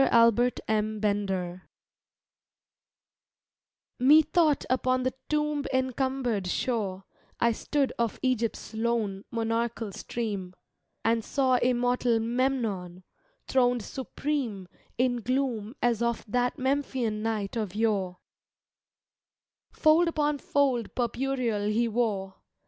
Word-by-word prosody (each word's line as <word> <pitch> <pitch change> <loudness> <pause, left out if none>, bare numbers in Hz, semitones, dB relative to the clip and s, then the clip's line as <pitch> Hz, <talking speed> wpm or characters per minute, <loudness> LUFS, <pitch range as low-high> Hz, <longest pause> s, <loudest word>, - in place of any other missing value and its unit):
ALBERT 235 +1 +4
M. 215 0 0
BENDER 190 -3 -2 2.3
Mcthought 305 +2 +5
upon 255 0 +1
the 255 - 0 0.2
toml>cncumbered 260 -7 0
shore 195 -3 -1 0.4
I 235 - +4
stood 275 +4 -1
of 230 -2 -1
Egjrpf 235 -3 +1
s - - -11
lone, 220 -3 -1
monarchal 230 -1 -1
stream 205 -4 -4 0.5
And 230 0 +2
saw 260 +1 +2
immortal 245 -1 +2
Memnon, 225 -7 -1 0.4
throned 245 -3 +2
supreme 260 -6 -3 0.3
In 250 0 +2
gloom 240 -2 -1
as 235 -2 +2
of 235 -1 -1
that 245 +5 0
Memphian 260 -5 -1
night 215 -2 -2
of 210 -4 -3
yore: 200 -5 0 1.5
Fold 315 +3 +4
upon 300 -3 0
fold 265 -6 0
purpureal 240 -3 -1
he 235 +2 +2
wore. 210 -5 -1
235 Hz, 100 wpm, -28 LUFS, 215-260 Hz, 2.3 s, Mcthought